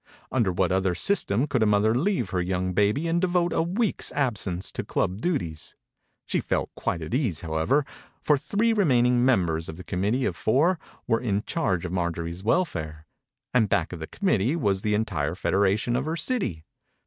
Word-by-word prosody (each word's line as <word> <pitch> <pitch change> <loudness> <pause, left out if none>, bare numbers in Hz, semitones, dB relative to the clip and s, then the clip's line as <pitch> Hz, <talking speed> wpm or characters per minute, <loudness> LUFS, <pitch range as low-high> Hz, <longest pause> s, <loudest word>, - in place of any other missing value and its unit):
Under 115 -8 +2
what 90 0 +1
other 95 -1 +1
system 130 - +1
could 140 -5 0
a 110 - +4
mother 105 +1 +3
leave 135 - 0
her 90 - 0
young 90 0 -1
baby 105 - +2
and 170 +1 +1
devote 175 -2 +1
a - - +2
week's 195 +6 -1
absence 105 -10 -1
to - - -4
club 95 +4 -1
duties? 85 - -3 0.5
She - - 0
felt - - -2
quite 85 - -3
at 80 - -6
ease, 120 - 0
however, 85 - +1 0.3
for 150 - +3
the 140 - -5
three 225 +3 +1
remaining 125 - +3
members 85 -10 +1
of 80 - -6
the 90 - -9
committee 105 +9 0
of - - -1
four 160 +10 +2 0.3
were 115 -2 +1
in 105 -4 0
charge 95 - -1
of 90 - -4
Marjorie's 85 0 -3
welfare, 80 - -1 0.5
and 115 -5 +3
back 85 +1 0
of 90 - -6
the 80 - -6
committee 145 - +1
was 100 - 0
the 105 0 +1
entire 90 -8 -1
federation 100 +5 +1
of 130 +3 -1
her 160 +2 -2
city. 160 - -1
110 Hz, 185 wpm, -26 LUFS, 90-145 Hz, 0.5 s, a